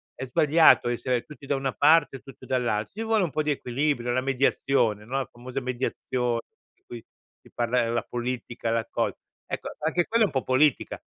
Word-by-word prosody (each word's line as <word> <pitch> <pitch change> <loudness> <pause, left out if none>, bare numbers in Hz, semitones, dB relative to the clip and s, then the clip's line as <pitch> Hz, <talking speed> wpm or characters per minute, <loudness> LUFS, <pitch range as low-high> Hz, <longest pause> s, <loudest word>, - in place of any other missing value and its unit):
è - - -6
sbagliato 150 +2 +5
essere 120 0 -1
tutti 150 -2 -13
da 140 - +1
una 135 -1 -2
parte 150 -1 +4
o - - -18
tutti 135 - -13
dall'altra. 120 -5 -1
Ci 220 - -4
vuole 220 -2 +2
un 170 - -2
po' 155 - -1
di 150 - 0
equilibrio, 130 -1 -1
la 130 +1 +1
mediazione, 130 -5 +1
no, 130 +4 -3
la 135 - -4
famosa 125 +2 -6
mediazio 125 -1 -2 0.3
di - - -42
cui 120 -2 -9 0.4
si - - -20
parla 120 +1 +1
nella 115 +1 0
politica, 120 -1 -4
la 115 0 -1
cosa. - - -1 0.3
Ecco, - - -4
anche 165 +3 0
quella 230 0 +3
è - - 0
un - - -8
po' 130 - 0
politica. 130 +1 +2
130 Hz, 200 wpm, -26 LUFS, 120-145 Hz, 0.4 s, sbagliato